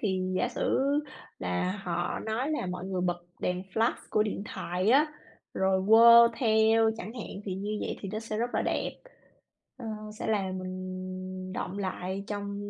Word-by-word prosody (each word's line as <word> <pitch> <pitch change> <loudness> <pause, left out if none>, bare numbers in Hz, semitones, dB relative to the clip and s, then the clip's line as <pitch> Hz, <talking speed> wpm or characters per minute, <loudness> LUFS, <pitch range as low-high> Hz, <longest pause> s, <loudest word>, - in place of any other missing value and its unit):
thì 190 -4 0 0.2
giả 245 - +1
sử 240 - 0 0.6
là 90 - -1
họ 175 0 -2
nói 230 +7 -1
là 300 -10 -1
mọi 180 0 -4
người 190 -1 -2
bật 175 -1 0 0.2
đèn 180 0 -1
flash 225 +1 +3 0.2
của 215 - +3
điện 210 -2 -3
thoại 180 +4 0
á, 290 +5 +6 0.5
rồi 190 0 +2
quơ 235 +1 +9
theo 220 -1 +4
chẳng 215 +2 -6
hạn, 235 - -6 0.2
thì 190 - -3
như 205 +3 -3
vậy - - -3
thì 195 - -5
nó 215 - -2
sẽ 220 -1 -4
rất 240 +2 0
là - - +2
đẹp, - - -1 0.9
ờ, 245 - -8 0.3
sẽ - - -3
làm 190 -3 0
mình 185 0 -6
đọng 185 +1 -4
lại 190 0 -3
trong 205 0 -4
195 Hz, 175 wpm, -29 LUFS, 185-220 Hz, 0.9 s, quơ